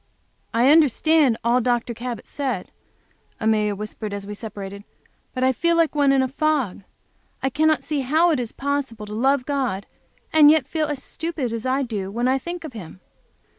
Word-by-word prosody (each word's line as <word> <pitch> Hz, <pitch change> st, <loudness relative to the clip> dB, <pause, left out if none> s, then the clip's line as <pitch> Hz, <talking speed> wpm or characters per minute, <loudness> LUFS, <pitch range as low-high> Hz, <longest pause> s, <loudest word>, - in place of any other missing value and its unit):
"I 245 Hz, +4 st, +4 dB
understand 305 Hz, -3 st, +4 dB
all 240 Hz, +2 st, +3 dB
Dr. 240 Hz, 0 st, 0 dB
Cabot 235 Hz, -1 st, -6 dB
said," 275 Hz, -3 st, -4 dB, 0.7 s
Amelia 215 Hz, -2 st, +1 dB
whispered, 210 Hz, 0 st, -6 dB
as 200 Hz, -1 st, -5 dB
we 205 Hz, -, -6 dB
separated. 200 Hz, -2 st, -7 dB, 0.5 s
But 255 Hz, -, -3 dB
I 260 Hz, 0 st, +4 dB
felt 340 Hz, +6 st, +1 dB
like 330 Hz, -2 st, +3 dB
one 285 Hz, -2 st, +3 dB
in 270 Hz, -1 st, +3 dB
a -, -, 0 dB
fog. 275 Hz, -7 st, 0 dB, 0.6 s
I 265 Hz, -, +1 dB
cannot 310 Hz, +2 st, +2 dB
see 300 Hz, -1 st, -2 dB
how 315 Hz, +7 st, +3 dB
it 300 Hz, -, +1 dB
is 235 Hz, -3 st, -3 dB
possible 270 Hz, -6 st, -3 dB
to 210 Hz, -, -8 dB
love 260 Hz, +3 st, +2 dB
God, 260 Hz, -9 st, -1 dB, 0.5 s
and 305 Hz, -2 st, +8 dB
yet 315 Hz, 0 st, +4 dB
feel 315 Hz, -2 st, -1 dB
as 290 Hz, -3 st, -4 dB
stupid 315 Hz, -8 st, -4 dB
as 230 Hz, +2 st, -3 dB
I 265 Hz, +2 st, +1 dB
do 210 Hz, -6 st, -4 dB
when 235 Hz, +5 st, -1 dB
I 265 Hz, +1 st, +2 dB
think 345 Hz, +5 st, -6 dB
of 310 Hz, -5 st, -8 dB
Him. 185 Hz, -5 st, -9 dB
260 Hz, 185 wpm, -23 LUFS, 220-295 Hz, 0.7 s, and